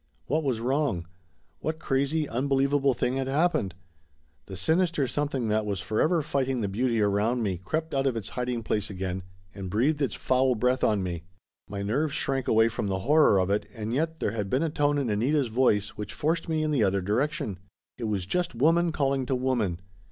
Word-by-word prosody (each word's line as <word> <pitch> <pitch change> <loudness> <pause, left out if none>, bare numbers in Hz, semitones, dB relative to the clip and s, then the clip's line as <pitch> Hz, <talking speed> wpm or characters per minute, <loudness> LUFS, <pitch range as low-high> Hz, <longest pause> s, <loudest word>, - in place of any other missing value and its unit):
What 155 +4 0
was 130 -5 0
wrong? 130 - 0 0.5
What 160 0 -2
crazy 145 +1 0
unbelievable 135 +1 +1
thing 125 +2 0
had 135 -1 -1
happened? 135 - +1 0.7
The 95 - -7
sinister 160 - +2
something 140 -4 -1
that 110 +1 +2
was 100 -2 -2
for 110 - -1
ever 165 0 +2
fighting 135 -4 -1
the 105 - 0
beauty 115 +4 0
around 105 +4 +1
me 95 -4 -1
crept 155 - -3
out 135 0 +1
of 130 - 0
its 110 -4 -5
hid 125 0 -3
ing 120 -2 -2
place 105 -1 -1
again 95 -1 -3 0.3
and 95 -2 -6
breathed 135 - +1
its 140 - 0
foul 130 0 +2
breath 125 +3 +1
on 105 -3 +2
me. 85 -3 -3 0.5
My 100 0 -4
nerves 140 +8 0
shrank 135 -2 -1
away 110 +1 +5
from 110 -2 -3
the 95 -1 -1
horror 150 -3 +5
of 95 +1 +1
it, 100 0 0
and 110 +1 -4
yet 160 +4 -1
there - - 0
had 105 -3 -3
been 130 +8 +1
a 165 - -1
tone 145 -1 +1
in 140 -3 0
Anita's 125 +5 +1
voice 110 -4 +2
which 105 -1 -7
forced 165 +2 -1
me 155 -1 +1
in 155 - 0
the 135 -7 +2
other 100 -1 +2
direction. 125 - -1 0.4
It 120 - -3
was 100 -4 -1
just 175 - -1
woman 165 +7 +3
calling 135 -4 0
to 130 - +1
woman. 120 -9 0
125 Hz, 205 wpm, -27 LUFS, 105-145 Hz, 0.7 s, away